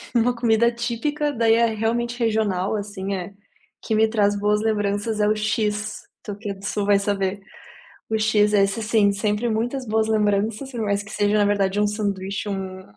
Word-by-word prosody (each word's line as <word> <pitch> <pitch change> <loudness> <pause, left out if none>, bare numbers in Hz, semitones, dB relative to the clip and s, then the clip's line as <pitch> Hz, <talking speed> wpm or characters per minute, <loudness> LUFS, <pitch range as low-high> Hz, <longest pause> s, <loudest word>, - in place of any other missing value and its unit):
uma 240 +1 +3
comida 235 0 +3
típica 250 +6 -2
daí 230 -3 +3
é 235 0 +4
realmente 235 +2 -1
regional 215 -4 0
assim 200 -1 -4
é, 185 +1 -6 0.5
que 220 - -1
me 220 +1 +4
traz 205 -2 +2
boas 210 +1 +1
lembranças 210 0 -1
é 210 - +3
o 215 - +2
X, 215 0 -1 0.2
tu 205 -2 -6
que 205 -1 -6
é - - -3
do 195 0 -12
sul 205 0 -1
vai 200 -1 +4
saber, 200 -1 -1 0.7
o 220 - +1
X 215 -1 +2
é 200 -1 +5
esse 195 +3 -1
sim 215 -2 +3
sempre 210 +3 -1
muitas 245 +3 -2
boas 220 0 +1
lembranças 215 +4 0
por 240 -3 -4
mais 200 -1 0
que 200 - -12
seja 205 0 +1
na 205 - +3
verdade 200 -1 +1
um 210 - +3
sanduíche, 200 -1 -3
um 190 -1 -5
210 Hz, 195 wpm, -23 LUFS, 200-225 Hz, 0.7 s, é